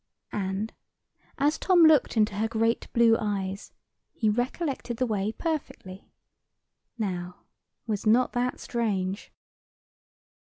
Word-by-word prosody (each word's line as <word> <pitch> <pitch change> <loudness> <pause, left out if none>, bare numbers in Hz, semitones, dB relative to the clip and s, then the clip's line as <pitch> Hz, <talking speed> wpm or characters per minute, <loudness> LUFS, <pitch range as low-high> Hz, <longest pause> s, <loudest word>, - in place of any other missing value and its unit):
And, 195 +2 -2 0.6
as 295 +3 +1
Tom 360 -3 +5
looked 310 -6 +5
into 210 -1 +3
her 220 +2 +1
great 225 +1 0
blue 230 -1 +5
eyes, 195 -2 -3 0.4
he 220 -2 +1
recollected 250 +1 -2
the 255 - +1
way 210 -2 -1
perfectly. 265 - -5 0.9
Now, 180 -4 -4 0.4
was 215 -2 -2
not 245 +4 +4
that 250 0 -1
strange? 200 -5 -2
225 Hz, 110 wpm, -27 LUFS, 200-250 Hz, 0.9 s, Tom